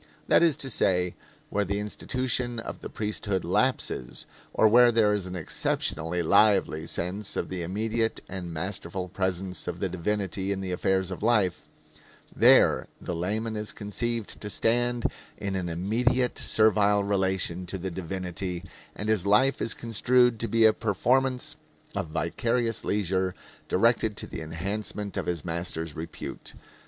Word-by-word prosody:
That - - +5
is 165 -4 +4
to 135 - -5
say, 90 -4 +1 0.4
where 105 - +1
the 100 +1 -2
institution 120 +3 -1
of - - -7
the - - -6
priesthood 105 -3 -2
lapses, - - 0 0.3
or 110 - +4
where 120 +2 +7
there 110 -2 +3
is 100 -3 -1
an 90 - -6
exceptionally 85 0 -1
lively 100 -4 +4
sense 95 +4 -2
of - - -2
the 95 -1 -4
immediate 110 +6 -1
and 90 -2 -6
masterful 90 +2 -4
presence 95 0 -2
of 90 0 -4
the 95 - 0
divinity 95 +1 -2
in 100 - -1
the 95 -1 -4
affairs 95 +1 0
of 95 - -6
life, 105 -6 +2 0.7
there - - +5
the 90 - -4
layman 110 +6 -2
is 105 0 -3
conceived 115 +1 -3
to 105 - -5
stand 120 +3 +1 0.3
in 100 -1 -3
an 90 -2 -2
immediate 120 +9 +1
servile 105 -2 +3
relation 95 -3 0
to 95 - -3
the 95 +1 -4
divinity, 90 0 -4 0.3
and 105 - -4
his 105 -3 +1
life 130 +7 +4
is 115 - 0
construed 120 +1 +2
to 115 - -1
be 115 -1 +4
a 110 - +7
performance 125 +4 +1 0.4
of - - -1
vicarious 115 +9 -1
leisure 95 -2 0 0.3
directed 110 +1 +2
to - - -2
the - - -7
enhancement 100 +5 -4
of - - -3
his 85 -2 -2
master's 80 -2 -3
repute. 80 +2 -7
100 Hz, 150 wpm, -27 LUFS, 90-110 Hz, 0.7 s, where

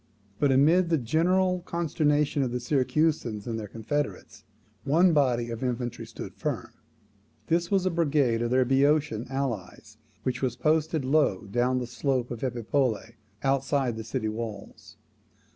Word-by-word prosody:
But, 145 -2 +3
amid 165 +7 +4
the 165 - +3
general 180 +8 +2
consternation 150 -4 0
of 130 - 0
the 125 - -2
Syracusans 130 -4 0
and 115 -2 -3
their 105 - -6
confederates, 140 +8 -4 0.4
one 170 +5 +4
body 120 -5 +2
of 115 +2 -5
infantry 120 -2 -3
stood 115 - -8
firm. - - -4 0.8
This 170 +1 +1
was 195 -2 +2
a 185 - +2
brigade 145 -8 +1
of 120 - 0
their 130 +1 +3
Boeotian 135 -3 +2
allies, 110 -5 -4 0.3
which 130 - -2
was 130 -2 0
posted 155 -2 +1
low 140 -8 +2
down 120 +5 0
the 125 - -2
slope 125 0 -1
of 120 - -5
Epipolae, 120 -2 -1 0.3
outside 135 -2 +1
the 110 - -5
city 110 0 -3
walls. 110 0 -7
135 Hz, 145 wpm, -27 LUFS, 120-155 Hz, 0.8 s, amid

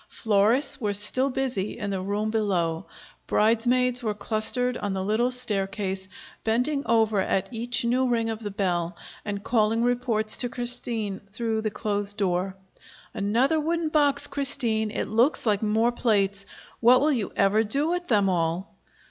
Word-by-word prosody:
Florists 225 +7 +1
were 205 -2 0
still 255 +7 +2
busy 250 -7 -2
in 205 -3 -3
the 190 -1 -2
room 205 +3 -2
below. 180 -7 -1 0.4
Bridesmaids 245 +3 +2
were 215 -3 -2
clustered 240 +4 -1
on 205 -1 -2
the 190 0 -2
little 220 +4 +1
staircase, 195 -5 -3 0.4
bending 250 +6 +1
over 220 -2 +3
at 190 0 0
each 240 +2 -1
new 255 +2 +2
ring 230 -2 +1
of 225 -1 -3
the 210 -2 -5
bell 180 -3 -2 0.3
and 205 -1 -4
calling 225 0 +2
reports 240 -3 0
to 245 - +2
Christine 235 -5 0
through 220 0 -2
the 215 - -1
closed 205 -1 -3
door: 190 -1 -1 0.6
"Another 245 +10 +1
wooden 330 +1 -1
box, 290 -2 +2
Christine. 235 -6 -1
It - - -3
looks 240 +7 +1
like 210 -3 +2
more 220 +2 +2
plates. 200 -4 0 0.3
What 245 +2 +6
will 295 +2 +2
you 225 -6 -2
ever 210 +3 +3
do 275 +8 -1
with 355 0 -2
them 205 -4 +3
all?" 175 +1 -1
220 Hz, 155 wpm, -25 LUFS, 200-245 Hz, 0.6 s, What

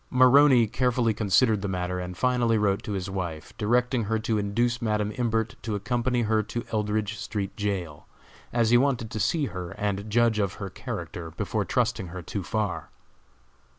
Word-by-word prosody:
Maroney 130 -1 +6
carefully 120 0 +1
considered 105 +1 +3
the 100 - -2
matter, 90 -1 -2
and 90 0 -6
finally 125 -3 +2
wrote 100 -2 +1
to 105 - -5
his 95 -1 -3
wife, 90 -5 -5
directing 120 +2 +1
her 110 +2 0
to 110 0 0
induce 120 +4 0
Madam 105 -2 0
Imbert 115 -2 0
to 110 -2 -3
accompany 120 +4 0
her 110 0 +2
to 120 +3 -5
Eldridge 105 0 -1
street 100 -3 -4
jail, 95 -8 -3 0.4
as 115 -1 +2
he 120 - +7
wanted 125 -5 0
to 110 - -4
see 155 +6 +1
her 90 -2 -5
and 100 0 -2
judge 115 0 +3
of 100 -3 0
her 100 -3 -6
character 85 -1 -6
before 80 - -2
trusting 95 - 0
her 90 +1 -7
too 100 - -4
far. 105 +2 -2
110 Hz, 175 wpm, -26 LUFS, 100-120 Hz, 0.4 s, he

